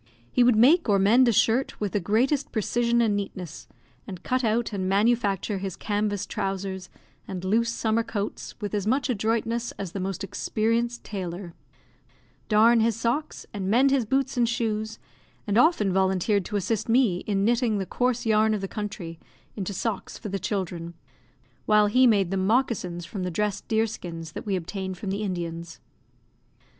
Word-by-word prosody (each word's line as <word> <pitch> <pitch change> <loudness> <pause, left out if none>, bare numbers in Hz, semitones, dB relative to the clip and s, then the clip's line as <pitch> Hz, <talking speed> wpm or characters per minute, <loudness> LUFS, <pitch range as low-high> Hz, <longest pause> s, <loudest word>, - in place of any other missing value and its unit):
He 250 - +4
would 240 -1 +5
make 270 +6 +5
or 200 - +5
mend 225 +7 +5
a - - +5
shirt 230 +4 +2
with 205 -2 -2
the 205 - 0
greatest 240 - +1
precision 235 +2 +1
and 215 -3 +2
neatness, 185 -4 -6 0.4
and 185 -3 -8
cut 255 0 0
out 225 0 0
and 190 -2 -1
manufacture 205 -1 +1
his 190 -2 -4
canvas 205 -1 -1
trousers 190 -1 -4 0.4
and 185 -1 -5
loose 230 +4 +2
summer 230 0 0
coats 210 -3 -5
with 205 -2 -4
as 205 -1 -1
much 260 +2 +1
adroitness 230 +1 -1
as 195 -4 -6
the 195 - -5
most 190 +1 -3
experienced 230 +4 -1
tailor; 180 -3 -6 1.0
darn 225 +2 +5
his 225 -1 +2
socks, 240 +7 -2
and 195 -2 -3
mend 260 +6 +4
his 265 -4 +2
boots 270 +2 0
and 235 -1 +3
shoes, 220 -2 -2 0.5
and 205 - -1
often 230 - +4
volunteered 190 +1 +1
to 210 - -5
assist 205 +3 -1
me 230 -6 +3
in 200 -1 +1
knitting 235 -2 +2
the 195 - -2
coarse 245 +3 -1
yarn 220 0 +3
of 205 - -4
the 195 - -3
country 185 -6 -6 0.4
into 200 -1 -3
socks 200 +1 -3
for 215 - -7
the 195 0 -2
children, 175 -3 -3 0.7
while 210 0 +5
he 250 +5 +5
made 200 -5 +3
them 190 -1 0
moccasins 210 -8 0
from 195 +2 -6
the 180 - -1
dressed 205 +3 -2
deer 220 -1 +2
skins 165 -7 -7
that - - -8
we 195 - +1
obtained 190 +1 -4
from 195 +1 -4
the 200 +2 -2
Indians. 170 -4 -4
210 Hz, 175 wpm, -26 LUFS, 190-230 Hz, 1.0 s, would